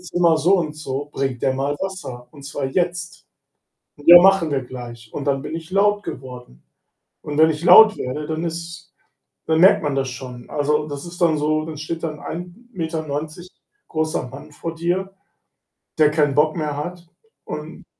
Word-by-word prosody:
Zimmer 175 Hz, -2 st, +2 dB
so 185 Hz, +5 st, +4 dB
und 155 Hz, -3 st, -2 dB
so, 145 Hz, -1 st, -5 dB
bringt 135 Hz, -3 st, -2 dB
der 130 Hz, -, +2 dB
mal 140 Hz, +2 st, -1 dB
Wasser, 185 Hz, -11 st, -6 dB
und 140 Hz, -2 st, -14 dB
zwar 140 Hz, 0 st, -4 dB
jetzt.“ 175 Hz, +4 st, -3 dB, 0.7 s
„Ja, 170 Hz, +4 st, +9 dB
machen 195 Hz, -4 st, +4 dB
wir 135 Hz, -2 st, 0 dB
gleich.“ 120 Hz, -2 st, -10 dB
Und 145 Hz, -, -5 dB
dann 140 Hz, -1 st, 0 dB
bin 155 Hz, -, -6 dB
ich 165 Hz, 0 st, -8 dB
laut 205 Hz, +1 st, +3 dB
geworden. 125 Hz, -, -9 dB, 0.6 s
Und 150 Hz, 0 st, -5 dB
wenn 160 Hz, 0 st, +6 dB
ich 155 Hz, 0 st, -4 dB
laut 215 Hz, +5 st, +8 dB
werde, 150 Hz, +4 st, -4 dB
dann 160 Hz, +2 st, -3 dB
ist 170 Hz, +2 st, -6 dB, 0.6 s
dann 160 Hz, 0 st, +2 dB
merkt 190 Hz, +1 st, +6 dB
man 145 Hz, -2 st, -1 dB
das 135 Hz, -1 st, -1 dB
schon. 125 Hz, -1 st, -9 dB
Also, 150 Hz, +1 st, 0 dB
das 145 Hz, 0 st, -6 dB
ist 175 Hz, +1 st, -10 dB
dann 165 Hz, -3 st, +3 dB
so, 155 Hz, +1 st, 0 dB
dann 160 Hz, -1 st, -7 dB
steht 160 Hz, +2 st, -5 dB
da 165 Hz, -, 0 dB
'n 150 Hz, -1 st, -9 dB
1,90m 165 Hz, -, -6 dB, 0.4 s
großer 155 Hz, -4 st, -2 dB
Mann 135 Hz, +4 st, -11 dB
vor 165 Hz, +3 st, -6 dB
dir, 180 Hz, +3 st, -1 dB, 0.9 s
der 155 Hz, -1 st, +5 dB
keinen 150 Hz, -2 st, +1 dB
Bock 155 Hz, +3 st, +2 dB
mehr 150 Hz, -2 st, -2 dB
hat 175 Hz, +3 st, -6 dB, 0.4 s
und -, -, -8 dB
155 Hz, 175 wpm, -21 LUFS, 140-175 Hz, 0.9 s, Ja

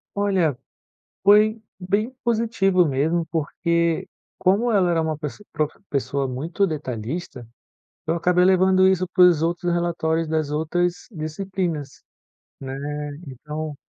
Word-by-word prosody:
Olha, 190 Hz, -9 st, +1 dB, 0.7 s
foi 215 Hz, +2 st, +5 dB, 0.2 s
bem 200 Hz, +5 st, -1 dB
positivo 220 Hz, -6 st, +2 dB
mesmo 155 Hz, +5 st, 0 dB
porque, 170 Hz, +1 st, -1 dB, 0.3 s
como 200 Hz, +6 st, +2 dB
ela 190 Hz, -5 st, +3 dB
era 165 Hz, -1 st, +2 dB
uma 160 Hz, -2 st, -2 dB
pessoa 155 Hz, +7 st, -7 dB
profe 150 Hz, 0 st, -2 dB
pessoa 140 Hz, -1 st, -1 dB
muito 160 Hz, +10 st, -1 dB
detalhista, 130 Hz, -, -5 dB, 0.6 s
eu 160 Hz, -, +1 dB
acabei 180 Hz, +1 st, +3 dB
levando 185 Hz, 0 st, +4 dB
isso 185 Hz, -1 st, +2 dB
para 180 Hz, 0 st, +5 dB
os 170 Hz, -4 st, +5 dB
outros 175 Hz, +1 st, 0 dB
relatórios 165 Hz, -2 st, 0 dB
das 155 Hz, -2 st, -1 dB
outras 170 Hz, +4 st, -1 dB
disciplinas, 160 Hz, -, -4 dB, 0.6 s
né, 135 Hz, -1 st, -5 dB, 0.5 s
então 150 Hz, +3 st, -6 dB
170 Hz, 120 wpm, -23 LUFS, 155-190 Hz, 0.7 s, foi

